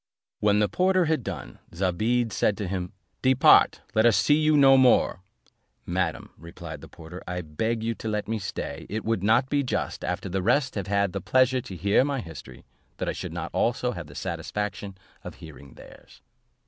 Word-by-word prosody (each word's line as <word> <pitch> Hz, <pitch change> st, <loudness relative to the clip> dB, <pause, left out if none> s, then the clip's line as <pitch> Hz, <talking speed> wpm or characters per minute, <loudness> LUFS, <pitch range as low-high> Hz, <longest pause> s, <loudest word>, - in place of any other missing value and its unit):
When 105 Hz, 0 st, +3 dB
the 105 Hz, 0 st, +3 dB
porter 185 Hz, -, +2 dB
had 155 Hz, -5 st, 0 dB
done, -, -, -7 dB, 0.2 s
Zobeide 110 Hz, +6 st, 0 dB
said 105 Hz, -, +1 dB
to 105 Hz, -, -3 dB
him, 90 Hz, -1 st, -4 dB, 0.3 s
"Depart, 130 Hz, 0 st, +5 dB
let 110 Hz, -, +3 dB
us 115 Hz, -4 st, +5 dB
see 145 Hz, -, +3 dB
you 155 Hz, +1 st, +3 dB
here 145 Hz, -, +5 dB
no 135 Hz, -1 st, +7 dB
more." 130 Hz, -6 st, +4 dB, 0.7 s
"Madam," -, -, -2 dB
replied 85 Hz, 0 st, -9 dB
the -, -, -11 dB
porter, 85 Hz, +2 st, -11 dB
"I 90 Hz, 0 st, -3 dB
beg 110 Hz, +9 st, -2 dB
you 115 Hz, +1 st, -1 dB
to 110 Hz, -, -8 dB
let 105 Hz, -1 st, -2 dB
me 110 Hz, 0 st, -2 dB
stay; 100 Hz, -, -6 dB
it 110 Hz, +1 st, -4 dB
would 115 Hz, -4 st, 0 dB
not 115 Hz, +6 st, +3 dB
be 145 Hz, +1 st, +1 dB
just, 130 Hz, -, -3 dB
after -, -, -3 dB
the 95 Hz, +1 st, -2 dB
rest 125 Hz, +6 st, +1 dB
have 100 Hz, -4 st, -4 dB
had 100 Hz, -2 st, +1 dB
the -, -, -3 dB
pleasure 130 Hz, 0 st, +2 dB
to 115 Hz, -7 st, -9 dB
hear 100 Hz, +7 st, +2 dB
my 140 Hz, -1 st, -1 dB
history, 70 Hz, -, -10 dB, 0.3 s
that -, -, -2 dB
I -, -, -1 dB
should -, -, -6 dB
not -, -, -5 dB
also 125 Hz, +1 st, 0 dB
have 85 Hz, -8 st, -7 dB
the 70 Hz, -, -13 dB
satisfaction 100 Hz, +3 st, -4 dB, 0.3 s
of -, -, -8 dB
hearing 70 Hz, -4 st, -13 dB
theirs." -, -, -16 dB
105 Hz, 200 wpm, -26 LUFS, 90-125 Hz, 0.7 s, no